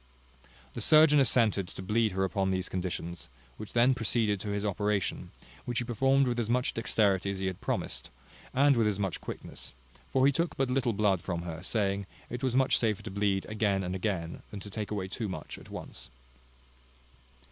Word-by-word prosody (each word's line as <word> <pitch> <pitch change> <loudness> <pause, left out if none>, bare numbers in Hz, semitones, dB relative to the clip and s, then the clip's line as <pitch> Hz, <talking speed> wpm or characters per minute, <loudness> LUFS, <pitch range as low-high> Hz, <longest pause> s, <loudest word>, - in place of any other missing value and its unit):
The - - -5
surgeon 155 -1 +6
assented 110 -7 +3
to 95 - -8
bleed 110 +1 +1
her 95 +1 0
upon 95 0 0
these 95 -1 -1
conditions, 90 -3 -4 0.3
and 110 - -6
then 120 +5 +4
proceeded 115 -4 +1
to 105 - -5
his 100 0 -1
operation, 105 0 -1 0.4
which 120 -1 -3
he 120 - +1
performed 135 +4 +3
with 120 -1 0
as 115 -2 -1
much 125 +1 +1
dexterity 100 -4 +1
as 100 - -2
he 95 - -3
had 95 -1 -3
promised; - - -3 0.4
and 140 +1 +4
with 115 -2 +3
as 105 -2 0
much 95 -4 -2
quickness: - - -8 0.4
for 130 0 +4
he 140 - +6
took 170 +4 -1
but 135 -2 +1
little 125 -3 +1
blood 100 -3 +2
from 85 -1 -3
her, 85 -1 -6
saying, 100 0 -1 0.2
it 120 0 -4
was 130 -2 0
much 130 0 +4
safer 110 -2 0
to 105 - -6
bleed 100 -1 0
again 105 -3 0
and 90 0 -3
again, 90 -3 -2
than 105 - -7
to 100 - -8
take 105 +1 -4
away 100 -3 -2
too 110 +2 -4
much 95 - -6
at - - -14
once. - - -8
105 Hz, 195 wpm, -30 LUFS, 95-120 Hz, 0.4 s, surgeon